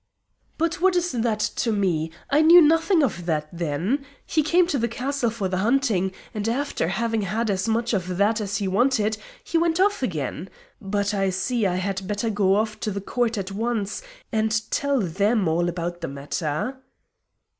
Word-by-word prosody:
"But 330 +1 -1
what 375 0 +4
is 355 0 +1
that 225 -3 0
to 230 +2 0
me? 180 -6 0 0.2
I 290 +2 +5
knew 335 +3 +9
nothing 325 +2 +4
of 175 -9 -2
that 155 -2 0
then. 170 - -1 0.2
He 315 - +1
came 345 +4 +3
to 290 -6 -1
the 235 - +1
castle 250 +1 -1
for 215 -4 -3
the 185 0 -2
hunting, 215 -4 +1 0.2
and 215 +1 -2
after 265 - -1
having 225 +4 -1
had 215 +3 -1
as 190 +2 -1
much 230 +1 0
of 180 -2 -2
that 215 +3 +2
as 200 -1 -2
he 200 - -2
wanted 220 +1 +1 0.2
he 330 - 0
went 335 0 +1
off 405 -2 +2
again. 170 - -3 0.3
But 200 +1 -1
I 195 -1 +1
see 200 +4 0
I 180 - -1
had 190 0 -3
better 210 +3 -1
go 200 -2 +2
off 215 +1 -1
to - - -2
the 200 -1 -3
Court 235 +3 -1
at 195 -1 -4
once 215 - -2 0.3
and 220 -1 +1
tell 280 -3 +1
them 200 +3 +1
all 170 +2 +1
about 175 0 -4
the 165 - -3
matter." 150 - -3
215 Hz, 190 wpm, -24 LUFS, 185-250 Hz, 0.3 s, knew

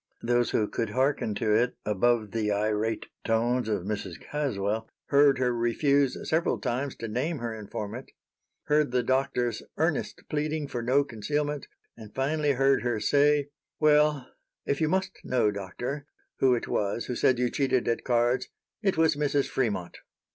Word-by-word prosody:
Those 120 0 +2
who 105 - +1
could 115 +1 -2
hearken 130 -2 0
to 105 +1 +1
it 120 +3 +2
above 110 +1 +1
the 110 -2 0
irate 105 +2 0 0.2
tones 120 +1 +1
of 105 -5 -1
Mrs. 95 -4 -4
Caswell 110 -7 -2 0.2
heard 140 -1 +5
her 125 -1 +1
refuse 135 +4 +2
several 160 +2 +1
times 130 +3 -2
to 115 - -6
name 130 +9 -1
her 115 -3 -4
informant; 110 +3 -6 0.5
heard 150 -1 +2
the 125 0 +1
Doctor's 125 -1 0 0.2
earnest - - -1
pleading 150 0 -2
for 120 -3 -4
no 130 +5 +3
concealment, 145 +5 -3 0.3
and 110 -3 -12
finally 145 +2 +1
heard 135 +1 +3
her 120 -3 -1
say: 145 +2 +3 0.3
"Well, 150 -3 +4 0.4
if 140 - -1
you 155 - +3
really - - -1
must 190 0 -1
know, 115 -5 +2
Doctor, 120 +9 -5 0.3
who 130 -2 +4
it 120 - -4
was 105 +3 -1
who 125 - -3
said 125 +1 +3
you 125 0 0
cheated 130 -3 +1
at 115 - 0
cards, 120 +1 +1 0.3
it 195 -6 +1
was 160 -2 +4
Mrs. 145 -1 0
Fremont." 100 -9 -2
125 Hz, 160 wpm, -28 LUFS, 110-145 Hz, 0.5 s, heard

